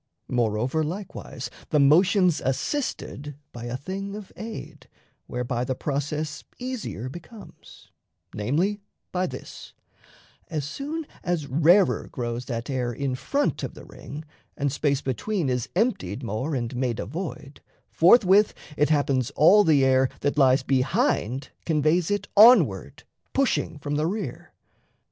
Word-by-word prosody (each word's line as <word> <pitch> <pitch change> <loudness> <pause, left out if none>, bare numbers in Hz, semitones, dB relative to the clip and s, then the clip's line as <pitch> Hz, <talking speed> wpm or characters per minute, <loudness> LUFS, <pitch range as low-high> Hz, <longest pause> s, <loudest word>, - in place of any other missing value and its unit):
Moreover, 120 +5 0
likewise, 170 -6 -6 0.2
The 150 - +3
motion's 175 +4 +4
assisted 145 - -3 0.2
by 120 0 -8
a 120 +1 -3
thing 195 +7 -5
of 210 -2 -9
aid 165 - -8 0.4
(Whereby 125 0 -2
the 130 +1 -2
process 150 +2 -3
easier 250 - -5
becomes), 175 - -12 0.4
Namely, 170 - 0 0.3
by 185 0 0
this: - - -9 0.7
as 155 -5 -3
soon 295 - -4 0.2
as 175 -4 -1
rarer 165 +8 +3
grows 120 -1 -4
That 115 -2 -4
air 125 -3 -1
in 135 +2 -2
front 275 - -1
of - - -5
the - - -11
ring, 150 +2 -9 0.3
and 140 -1 0
space 145 -1 0
between 150 - -1
Is 125 -2 -1
emptied 140 - 0
more 120 +7 -2
and 120 0 -3
made 125 -2 -1
a - - -3
void, 155 -5 -7 0.3
forthwith 195 +2 +5 0.2
It 150 0 +2
happens 140 -4 +1
all 200 +8 +7
the 145 -6 +4
air 130 0 +4
that 145 - 0
lies 130 -2 +4
behind 135 - 0
Conveys 160 +2 +2
it 205 0 -1
onward, 230 +5 +6 0.3
pushing 270 - +1
from 145 0 -3
the 155 +1 +1
rear. 190 - -5
150 Hz, 135 wpm, -25 LUFS, 130-185 Hz, 0.7 s, all